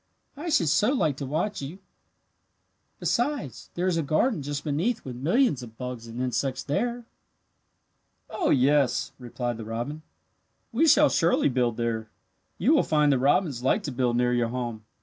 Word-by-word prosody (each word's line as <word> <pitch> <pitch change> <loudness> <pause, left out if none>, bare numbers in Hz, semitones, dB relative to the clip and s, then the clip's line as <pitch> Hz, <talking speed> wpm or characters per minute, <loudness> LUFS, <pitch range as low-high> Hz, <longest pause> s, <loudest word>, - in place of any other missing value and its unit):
"I 315 +5 -5
should 170 - +3
so 210 - +3
like 155 - +1
to 140 - -5
watch 170 +8 -2
you. 145 +7 -6 1.2
Besides, 240 - -2
there 175 - -1
is 180 -3 +1
a - - +2
garden 155 - +1
just 145 +1 -4
beneath 175 +11 -1
with 130 -2 -6
millions 165 - +2
of 115 -2 -11
bugs 125 -2 -6
and 115 +1 -7
insects 130 +1 -1
there." 240 +11 -2 1.2
"Oh, 215 - -1
yes," 135 -1 +3
replied 120 -1 -4
the 115 - -6
robin. 120 +8 -4 0.7
"We 300 +8 +3
shall 295 0 +6
surely 165 -2 +2
build 120 -3 0
there. 115 -2 -2 0.5
You 250 - +3
will 305 - +5
find 150 -2 +2
that 135 - +2
robins 140 -1 +2
like 165 - +1
to 145 - -4
build 125 -2 0
near 125 0 +2
your 120 -1 +1
home. 120 -3 -4
140 Hz, 170 wpm, -26 LUFS, 125-185 Hz, 1.2 s, shall